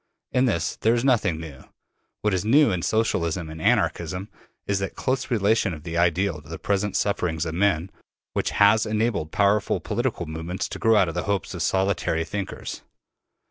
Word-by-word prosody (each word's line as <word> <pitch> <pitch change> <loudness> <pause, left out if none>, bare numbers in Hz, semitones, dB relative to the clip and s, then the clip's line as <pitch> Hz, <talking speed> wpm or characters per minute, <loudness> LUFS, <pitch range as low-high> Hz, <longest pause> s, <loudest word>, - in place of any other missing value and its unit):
In 125 +1 +3
this 85 -9 -1
there 115 +2 +2
is 120 +2 0
nothing 110 -11 +2
new. 75 -5 -9 0.6
What 105 -2 +2
is 95 - 0
new 135 +4 +5
in 90 -2 -1
Socialism 85 -6 0
and 80 0 -8
Anarchism, 95 +4 0 0.4
is 100 -1 0
that 95 - -4
close 130 0 -1
relation 105 -5 +2
of 75 - -12
the 85 -1 -5
ideal 85 -1 +1
to 75 - -17
the 80 - -5
present 100 0 -1
sufferings 85 -5 0
of 80 - -3
men, 90 -1 +1 0.4
which - - 0
has 105 +2 +4
enabled 110 -7 -1
powerful 100 +1 +2
political 115 -4 -2
movements 80 +4 -4
to - - -6
grow 115 0 +4
out 95 -4 +4
of 85 - -3
the 90 - -3
hopes 100 -3 -1
of - - -5
solitary 95 -4 +1
thinkers. 100 +4 -5
95 Hz, 180 wpm, -24 LUFS, 85-105 Hz, 0.6 s, new